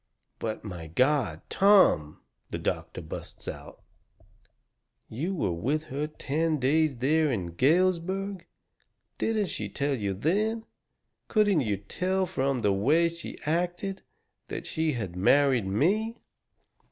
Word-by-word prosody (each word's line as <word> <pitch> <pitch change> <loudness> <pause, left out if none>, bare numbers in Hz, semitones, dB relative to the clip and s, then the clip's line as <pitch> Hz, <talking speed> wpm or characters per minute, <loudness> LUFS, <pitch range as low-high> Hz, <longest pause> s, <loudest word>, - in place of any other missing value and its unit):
"But, 110 -1 -4
my 90 -6 -7
God! 125 - +1
Tom," 190 - +4 0.3
the - - -3
doctor - - -3
busts - - -8
out, - - -8 1.3
"you 160 - -3
were 120 - 0
with 135 - -1
her 145 +2 -1
ten 155 +1 -1
days 145 +1 +2
there 150 +4 +2
in 90 -8 -2
Galesburg! 185 - +1 0.7
Didn't 215 -4 +1
she 105 -8 -2
tell 140 +6 -1
you 100 -6 -2
then 215 - 0 0.6
couldn't 205 -7 +3
you 105 -5 0
tell 185 - -1
from 135 -6 -1
the 100 -1 +3
way 150 +12 +3
she 170 0 -8
acted 175 +4 -1 0.5
that - - -5
she 160 -1 -1
had 100 -8 -4
married 130 +3 +3
me?" 205 - +1
150 Hz, 125 wpm, -28 LUFS, 110-180 Hz, 1.3 s, Tom